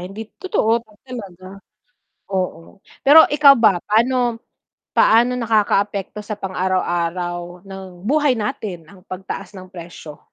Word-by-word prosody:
Hind 185 +3 -9 0.2
totoo 235 - +1 0.2
talaga, 195 -6 -10 0.7
oo. 185 -1 -4 0.2
Pero 300 +4 +8
ikaw 290 -1 +6
ba, 220 -7 +4
paano 235 +2 +1 0.5
paano 240 +3 +4
nakakaapekto 210 -3 0
sa 210 0 -6
pang-araw-araw 175 -1 -3
ng 190 -1 -10
buhay 290 -1 +2
natin 200 -5 -5
ang 185 +2 -17
pagtaas 190 0 -7
ng 185 - -11
presyo? 170 -4 -11
195 Hz, 110 wpm, -20 LUFS, 180-230 Hz, 0.7 s, Pero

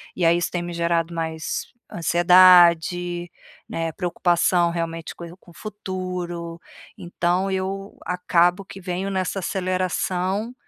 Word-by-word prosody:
E 175 - 0
aí 170 +1 +4
isso 175 - -1
tem 175 - -2
me 175 0 -6
gerado 170 0 0
mais 160 -1 -4 0.2
ansiedade, 175 0 +4 0.4
né, 165 -1 -3
preocupação 175 -1 +1
realmente 165 -1 -4
com 170 - -9
com 175 - -19
o - - -18
futuro, 180 -4 -6 0.4
então 175 +2 -1
eu 195 +1 -4
acabo 180 +1 +1
que 195 0 -11
venho 185 +2 -3
nessa 190 0 -2
aceleração 185 +3 -2
175 Hz, 125 wpm, -23 LUFS, 170-185 Hz, 0.4 s, aí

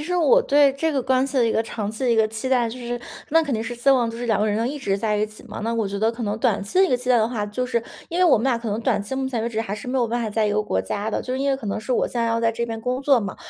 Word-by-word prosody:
实 355 +4 -2
我 475 +9 +5
对 285 - +4
这 320 +3 0
个 270 -3 0
关 260 +1 +2
系 275 - -5
的 250 - +4
一 230 - +2
个 220 - +1
长 210 -2 -4
期 220 +4 -4
的 - - +2
一 - - +3
个 220 -1 +3
期 220 +4 -4
待 245 -3 +2
就 245 +3 -7
是 240 0 -4 0.3
那 325 +2 +5
肯 285 -4 -3
定 220 - 0
是 240 - -4
希 240 +3 +2
望 250 -3 +3
就 230 - -6
是 240 +1 -4
两 220 -3 +1
个 215 - +2
人 225 +4 0
一 290 - -5
直 195 -7 -1
在 210 +1 0
一 210 +1 +1
起 215 0 -13
嘛， 230 -4 -9
那 230 +1 -1
我 225 -3 0
觉 200 0 -4
得 220 +2 +2
可 235 +1 -7
能 210 0 -2
短 - - +1
期 200 - -2
的 385 - +7
一 - - +1
个 250 - +2
期 250 +1 -3
待 250 - +6
的 220 +1 +2
话， 225 -4 -2
就 210 +5 -3
是 235 -2 0 0.3
因 335 - -4
为 - - +6
我 325 -9 +5
们 225 - -2
俩 260 -3 +2
可 230 -2 -4
能 210 +2 -2
短 225 -4 +1
期 235 +6 -5
目 265 0 -1
前 235 -4 -2
为 230 - -1
止 225 -2 -2
还 205 -3 -3
是 215 +4 -8
没 260 +1 0
有 240 - +2
办 235 +1 -2
法 220 - -2
在 215 +1 +1
一 205 - 0
个 210 +1 +1
国 95 - -1
家 205 - -3
的， - - -1
就 255 - -4
是 260 - -3
因 280 0 +1
为 270 - +1
可 240 - -8
能 200 - -2
是 215 +4 -3
我 - - +2
现 240 - -3
在 230 - +1
要 230 0 0
在 230 0 +2
这 235 +1 -2
边 225 -1 -5
工 250 +3 -2
作 275 -2 +4
嘛， 200 -4 -4
235 Hz, 420 characters per minute, -23 LUFS, 215-260 Hz, 0.3 s, 的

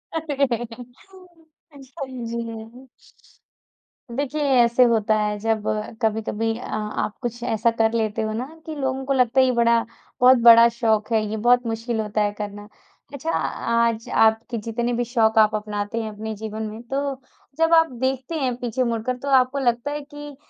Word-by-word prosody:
अरे! 280 -7 -1 1.1
अच्छा 275 +1 -9 0.3
जी। 230 +2 -7 1.3
देखिए, 290 +2 -2 0.2
ऐसे 240 +1 +5
होता 220 -1 +2
है 210 0 -1
जब 220 -1 -1
अ, 215 0 -2
कभी-कभी 220 0 -1
अ, 245 - -8
आप 210 0 -3
कुछ 240 -1 -4
ऐसा 230 -1 +1
कर 220 0 +3
लेते 220 -1 -1
हो 215 0 -2
ना 240 +4 -3 0.2
कि 315 - -6
लोगों 265 -1 -2
को 275 - 0
लगता 255 0 +2
है 260 - +6
ये 255 - +2
बड़ा 235 -1 +3 0.4
बहुत 255 +1 +7
बड़ा 230 0 +9
शौक 220 -1 0
है, 220 -1 +3
ये 220 - -3
बहुत 245 +2 +3
मुश्किल 225 +1 -3
होता 210 0 -2
है 205 0 +1
करना। 205 0 -6 0.5
अच्छा, 300 +4 -3
आज 230 -1 0
आपके 225 +2 +2
जितने 230 +2 -2
भी 240 +1 0
शौक 225 -2 +1
आप 215 0 +4
अपनाते 210 +1 -3
हैं 220 - -5
अपने 220 +1 -6
जीवन 220 +1 -6
में। 215 +2 -8
तो 280 0 -1 0.4
जब 325 +1 +3
आप 325 -3 +5
देखते 265 +4 -2
हैं 255 -3 -1
पीछे 250 +1 -2
मुड़कर, 235 +1 -2
तो 275 - -8
आपको 260 +1 +3
लगता 240 +2 0
है 295 0 -4
कि 290 -1 -9
235 Hz, 175 wpm, -23 LUFS, 220-260 Hz, 1.3 s, बड़ा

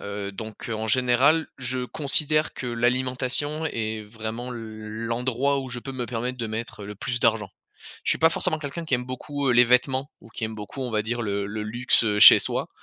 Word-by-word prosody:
Heu, 100 -1 -5
donc, 110 +2 -8
heu, - - -1
en 110 +1 -3
général, 130 +7 +3
je 130 0 -3
considère 150 +3 0
que 125 - -6
l'alimentation 130 +5 0
est 110 -4 -3
vraiment 115 +3 -6
l - - -6 0.5
l'endroit 125 +4 0
où 130 - -7
je 125 0 -5
peux 135 +3 -7
me 125 -2 -4
permettre 125 +2 -3
de 115 - -2
mettre 110 -1 -5
le 105 - -7
plus 120 +4 -3
d'argent. 110 -3 +2 0.5
Je - - +1
suis - - +1
pas 160 - +6
forcément 155 -1 0
quelqu'un 155 +3 -5
qui 155 - -9
aime 125 0 +1
beaucoup, 140 +2 -3
heu, - - +4
les 120 +1 +7
vêtements, 130 +3 +2
ou 115 - -16
qui 110 - -5
aime 110 0 -4
beaucoup 110 +6 -7
on 125 - -3
va 110 -1 +1
dire 120 +2 -2
le 100 -1 -2
le 105 +1 -4
luxe, 120 +2 +2
heu, 105 -1 +1
chez - - +11
soi, - - -3
120 Hz, 220 wpm, -25 LUFS, 110-130 Hz, 0.5 s, chez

